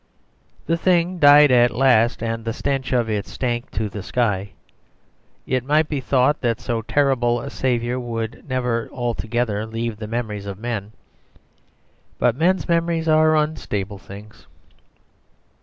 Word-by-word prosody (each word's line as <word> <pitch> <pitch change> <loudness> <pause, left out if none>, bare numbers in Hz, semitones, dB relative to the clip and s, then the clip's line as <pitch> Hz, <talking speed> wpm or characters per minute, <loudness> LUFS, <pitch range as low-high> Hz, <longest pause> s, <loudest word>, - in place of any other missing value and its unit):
The 165 - 0
thing 175 0 +1
died 145 -1 +7
at 120 -1 +5
last, 120 -2 +2
and 115 0 -3
the 115 0 -3
stench 135 +1 -2
of 120 -3 +1
it 105 -2 -2
stank 120 -2 -3
to 110 - -1
the 105 0 -7
sky. 100 -3 -1 0.9
It 130 -1 -1
might 150 +3 +2
be 145 -3 -2
thought 130 +2 +2
that 115 -3 0
so 115 -2 -2
terrible 120 -1 +1
a 140 +4 -7
savour 125 -1 -1
would 115 +1 -5
never 125 -3 -1
altogether 120 -3 -2
leave 115 0 -4
the 110 0 -7
memories 105 -3 -4
of 100 -1 -6
men; 110 -2 -5 1.2
but 120 - +2
men's 180 +6 +1
memories 170 -1 0
are 155 0 +4
unstable 105 -10 -2
things. 105 +3 -13
120 Hz, 140 wpm, -21 LUFS, 110-140 Hz, 1.2 s, died